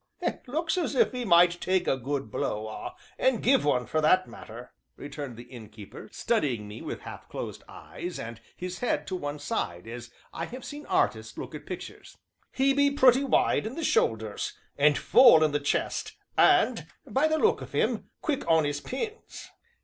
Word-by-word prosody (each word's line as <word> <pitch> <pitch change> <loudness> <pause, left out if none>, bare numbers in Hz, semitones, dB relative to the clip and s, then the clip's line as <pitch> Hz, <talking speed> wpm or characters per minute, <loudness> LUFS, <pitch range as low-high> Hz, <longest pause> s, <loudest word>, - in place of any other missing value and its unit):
"Looks 320 +6 -1
as 320 -4 -2
if 255 - +3
'e 250 -1 -3
might 175 -2 +5
take 185 -1 +1
a - - +3
good 135 -2 -4
blow, 105 +1 -2
ah! 110 - -7 0.2
and 260 -4 +2
give 265 +2 +4
one, 125 -4 +1
for 155 - 0
that 185 +4 +4
matter," 120 +3 -11 0.2
returned 145 -4 -7
the 120 - -9
Innkeeper, 110 - -11
studying 135 - -1
me 105 +2 -9
with - - -6
half - - -10
closed - - -6
eyes, 175 0 -7
and 115 0 -7 0.2
his 180 0 -5
head 245 - -1
to 190 - -4
one 145 -4 -4
side, 90 -11 -3
as 120 +1 -8 0.2
I 165 - -3
have 255 +5 -9
seen 295 0 -8
artists - - 0
look - - -7
at - - -9
pictures. - - -8 0.3
"He 270 +1 +2
be 285 0 +4
pretty 265 -1 +5
wide 255 -4 +2
in 235 - -6
the 330 - -4
shoulders, 110 - 0 0.2
and 145 +1 +4
full 205 -11 +7
in 155 - +2
the 145 - 0
chest, 145 - -1 0.2
and, - - +4 0.2
by 275 +4 +2
the 315 0 +1
look 440 +8 +2
of - - -9
him, - - 0
quick 295 -4 -1
on 160 -2 +4
'is 145 0 -2
pins." 430 - -6
165 Hz, 185 wpm, -28 LUFS, -, 0.3 s, full